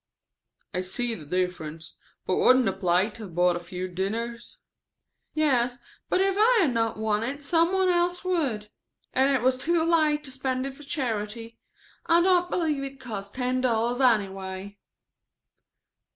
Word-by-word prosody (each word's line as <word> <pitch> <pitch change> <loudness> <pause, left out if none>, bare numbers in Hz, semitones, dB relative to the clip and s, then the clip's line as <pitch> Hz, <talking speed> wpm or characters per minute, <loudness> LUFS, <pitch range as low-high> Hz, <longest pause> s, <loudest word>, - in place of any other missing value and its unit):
"I 180 - 0
see 230 +6 -1
there 220 - -6
is 150 - -12
a - - -19
difference; 170 -3 -3 0.3
but - - 0
wouldn't 255 -1 +5
the - - +1
plate 185 +4 +1
have 200 -7 -9
bought 180 0 +3
a - - -2
few 180 +1 -5
dinners?" 225 - -4 0.8
"Yes, 250 -5 +2 0.3
but - - +2
if 385 0 +2
I 460 +1 +5
had 290 -9 +2
not 225 -1 0
won 215 -1 0
it 280 +5 -4
some 335 +3 +2
one 380 -1 +2
else 355 0 +1
would. 270 - -1 0.4
And 265 +1 +3
it 265 -4 +1
was 255 0 +3
too 330 +5 +1
late 310 -3 +2
to 270 - -8
spend 260 0 -2
it 275 - -5
for 275 - -14
charity. 230 -5 -4 0.5
I 335 0 +5
don't 355 -1 +3
believe 310 -6 0
it 275 0 -7
cost 205 -6 -6
ten 255 0 0
dollars 240 0 +1
anyway." 195 -4 0
245 Hz, 165 wpm, -26 LUFS, 205-300 Hz, 0.8 s, wouldn't